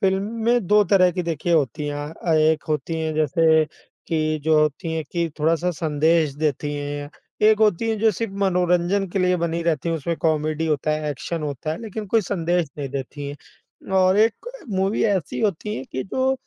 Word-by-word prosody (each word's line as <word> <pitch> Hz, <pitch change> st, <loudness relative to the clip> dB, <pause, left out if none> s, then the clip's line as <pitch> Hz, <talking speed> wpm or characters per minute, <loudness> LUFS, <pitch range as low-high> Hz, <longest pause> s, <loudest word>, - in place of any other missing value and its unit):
फ़िल्में 220 Hz, +3 st, +1 dB
2 210 Hz, +1 st, +5 dB
तरह 185 Hz, -2 st, +6 dB
की 180 Hz, -, -2 dB
देखिए 170 Hz, 0 st, -2 dB
होती 150 Hz, -1 st, +1 dB
हैं 145 Hz, 0 st, -4 dB, 0.2 s
अ, 165 Hz, -, +3 dB
एक 155 Hz, 0 st, +3 dB
होती 160 Hz, +1 st, -2 dB
हैं 160 Hz, -1 st, -2 dB
जैसे 160 Hz, +1 st, +3 dB, 0.4 s
कि 155 Hz, -1 st, 0 dB
जो 155 Hz, -1 st, +4 dB
होती 155 Hz, +2 st, -1 dB
हैं 160 Hz, -, -2 dB
कि 170 Hz, -1 st, 0 dB
थोड़ा-सा 165 Hz, +3 st, +2 dB
संदेश 155 Hz, -1 st, +1 dB
देती 145 Hz, -1 st, -1 dB
हैं। 145 Hz, 0 st, -5 dB, 0.3 s
एक 215 Hz, 0 st, +5 dB
होती 215 Hz, +1 st, +2 dB
हैं 220 Hz, -, -1 dB
जो 220 Hz, +1 st, +4 dB
सिर्फ़ 225 Hz, +2 st, -4 dB
मनोरंजन 180 Hz, +1 st, +2 dB
के 195 Hz, -, -1 dB
लिए 180 Hz, -1 st, +2 dB
बनी 170 Hz, 0 st, -1 dB
रहती 165 Hz, -1 st, 0 dB
हैं 165 Hz, -, 0 dB
उसमें 160 Hz, +2 st, -3 dB
कॉमेडी 155 Hz, 0 st, 0 dB
होता 155 Hz, -1 st, 0 dB
है, 150 Hz, -1 st, -2 dB
एक्शन 155 Hz, +4 st, -4 dB
होता 145 Hz, +1 st, -4 dB
है 160 Hz, -, -6 dB
लेकिन 215 Hz, -1 st, -6 dB
कोई 225 Hz, +3 st, +3 dB
संदेश 175 Hz, -3 st, 0 dB
नहीं 140 Hz, -2 st, -3 dB
देती 140 Hz, +1 st, -5 dB
हैं। 145 Hz, +5 st, -14 dB
और 185 Hz, +1 st, +4 dB
एक 225 Hz, -, +1 dB, 0.2 s
मूवी 195 Hz, +2 st, 0 dB
ऐसी 190 Hz, -8 st, 0 dB
होती 210 Hz, 0 st, -1 dB
है 130 Hz, -, -5 dB
कि 130 Hz, -, -2 dB
जो 260 Hz, +6 st, 0 dB
165 Hz, 195 wpm, -22 LUFS, 155-190 Hz, 0.4 s, तरह